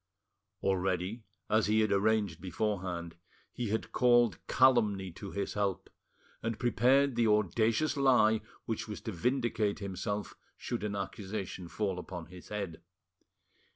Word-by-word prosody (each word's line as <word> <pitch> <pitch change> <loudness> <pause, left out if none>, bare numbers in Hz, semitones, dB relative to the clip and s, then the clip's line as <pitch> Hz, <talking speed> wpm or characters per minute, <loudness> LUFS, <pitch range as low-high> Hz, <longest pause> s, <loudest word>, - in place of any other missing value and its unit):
Already, 95 +3 0 0.3
as 110 -1 +3
he 110 +1 +3
had 110 -1 +1
arranged 100 -4 +1
beforehand, 90 -3 -3 0.4
he 120 -3 -3
had 110 +2 -2
called 120 -3 +4
calumny 105 -8 +3
to 100 +4 -8
his 100 +1 -3
help, 100 -2 -2 0.5
and 115 -1 -2
prepared 130 +3 +3
the 115 -1 +3
audacious 110 - +2
lie 125 -6 +4 0.2
which 110 -1 -3
was 105 - -5
to 110 - -4
vindicate 115 +1 0
himself 100 +1 -4 0.2
should 120 -3 -4
an 105 -1 -2
accusation 95 -2 -5
fall 95 0 -2
upon 90 -2 -7
his 90 +1 -13
head. 100 -6 -5
105 Hz, 130 wpm, -32 LUFS, 95-115 Hz, 0.5 s, called